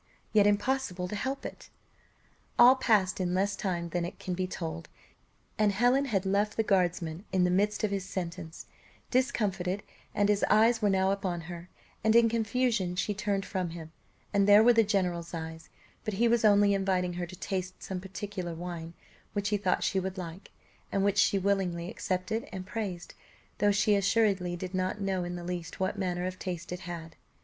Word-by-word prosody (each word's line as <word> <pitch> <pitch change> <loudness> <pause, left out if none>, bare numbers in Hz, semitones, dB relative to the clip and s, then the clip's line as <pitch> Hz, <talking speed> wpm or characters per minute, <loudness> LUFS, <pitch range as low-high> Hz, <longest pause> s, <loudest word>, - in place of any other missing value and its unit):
yet 205 -2 +6
impossible 205 -3 0
to 210 - -5
help 265 +6 -3
it. - - -8 0.9
All 250 +2 +8
passed 210 -8 +2
in 180 0 0
less 200 +2 +1
time 175 -3 -2
than 175 0 -1
it 175 - -5
can 185 - -4
be 185 +1 -1
told, 80 - -5 0.7
and 210 -1 +4
Helen 245 +7 +3
had 200 -7 0
left 205 +2 +1
the 225 - +3
guardsman 180 -4 0
in 185 -1 +2
the 180 - +3
midst 205 +4 +1
of 210 - +1
his 195 -2 -1
sentence, 175 -3 -6 0.5
discomfited, 200 -7 0 0.3
and 205 - +3
his 205 -1 +2
eyes 225 +2 +4
were 205 - +3
now 190 0 +2
upon 185 -3 -2
her; 175 +1 -9 0.3
and 220 +1 +3
in 235 -1 +6
confusion 225 -4 0
she 205 +3 0
turned 200 -1 -1
from 185 -3 -2
him, 165 -1 -8 0.4
and 200 0 +3
there 205 +1 +8
were 240 +1 +7
the 225 -1 +5
general's 180 -5 -1
eyes 160 0 -7 0.3
but 215 - -3
he 235 +4 +3
was 235 -1 +2
only 205 -1 +5
inviting 190 -2 0
her 175 0 -4
to 185 - -10
taste 185 0 -4
some 185 -2 -4
particular 190 -2 -5
wine, 170 -1 -6 0.4
which 205 0 -1
he 210 - +2
thought 190 -2 0
she 195 - +1
would 190 0 -4
like, 175 0 -7 0.4
and 195 - +1
which 200 0 +2
she 200 - +4
willingly 185 -3 0
accepted, 185 +5 -2
and 185 -1 -6
praised, 195 -4 -5 0.5
though 205 0 +4
she 205 +1 +3
assuredly 200 -3 +2
did 180 +1 -6
not 185 +2 -1
know 190 -2 -1
in 175 0 -4
the 175 - -6
least 175 -1 -5
what 190 +2 -1
manner 180 -2 -1
of 185 0 -4
taste 180 -2 -5
it 180 - -4
had. 170 -3 -7
190 Hz, 190 wpm, -29 LUFS, 180-205 Hz, 0.9 s, All